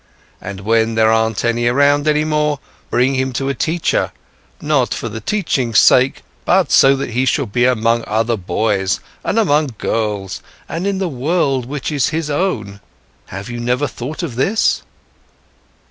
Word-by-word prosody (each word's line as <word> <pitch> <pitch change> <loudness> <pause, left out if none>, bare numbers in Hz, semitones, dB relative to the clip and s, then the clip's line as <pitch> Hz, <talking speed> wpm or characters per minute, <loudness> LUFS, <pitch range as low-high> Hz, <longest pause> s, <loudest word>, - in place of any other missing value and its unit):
And 95 +1 -7
when 110 +2 +1
there 110 0 +4
aren't 110 -1 +1
any 120 0 +1
around 145 +4 +3
any 150 0 +3
more, 150 -2 0 0.3
bring 130 +2 +2
him 130 0 -1
to 135 +3 -2
a - - 0
teacher, 160 +5 0 0.5
not - - +1
for - - -4
the 110 - -7
teachings' 130 - 0
sake, 130 +1 +4 0.2
but - - +2
so 135 +1 +6
that 135 -2 -4
he 125 +3 0
shall 135 +1 +1
be 120 +3 +1
among 115 -1 +2
other 115 +2 +1
boys, 95 0 -1 0.2
and 215 - -1
among 150 - +2
girls, 105 -4 -2 0.3
and 170 +6 -3
in 200 -1 0
the 190 -1 -1
world 135 -3 0
which 145 +2 -4
is 145 -3 +1
his 160 -1 -2
own. 110 - -2 0.5
Have 100 +3 -7
you 120 0 -6
never 125 +4 0
thought 145 +5 -6
of 130 -8 -5
this?" 200 - +1
125 Hz, 165 wpm, -17 LUFS, 115-150 Hz, 0.5 s, so